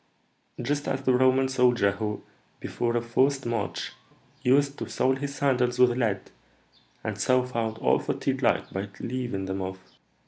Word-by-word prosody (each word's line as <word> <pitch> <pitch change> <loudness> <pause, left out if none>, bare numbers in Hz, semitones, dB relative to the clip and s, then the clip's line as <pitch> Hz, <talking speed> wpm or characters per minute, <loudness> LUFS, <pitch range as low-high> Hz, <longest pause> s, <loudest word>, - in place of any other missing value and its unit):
"Just 145 0 -1
as 135 0 -2
the 130 - +3
Roman 130 +1 +4
soldier 125 -6 +3
who, 105 +1 -4 0.4
before 120 0 -1
a - - 0
forced 130 +4 +1
march, 105 -7 -2 0.5
used 140 +2 +2
to - - -5
sole 130 0 +2
his 140 +1 -5
sandals 125 -3 +1
with 125 -1 +6
lead, 110 -6 -1 0.7
and - - -4
so 130 0 +3
found 115 -3 -2
all - - +3
fatigue - - -2
light - - +1
by 95 +1 -3
leaving 120 -6 -3
them 95 0 -3
off. 95 0 -4
125 Hz, 160 wpm, -27 LUFS, 110-130 Hz, 0.7 s, with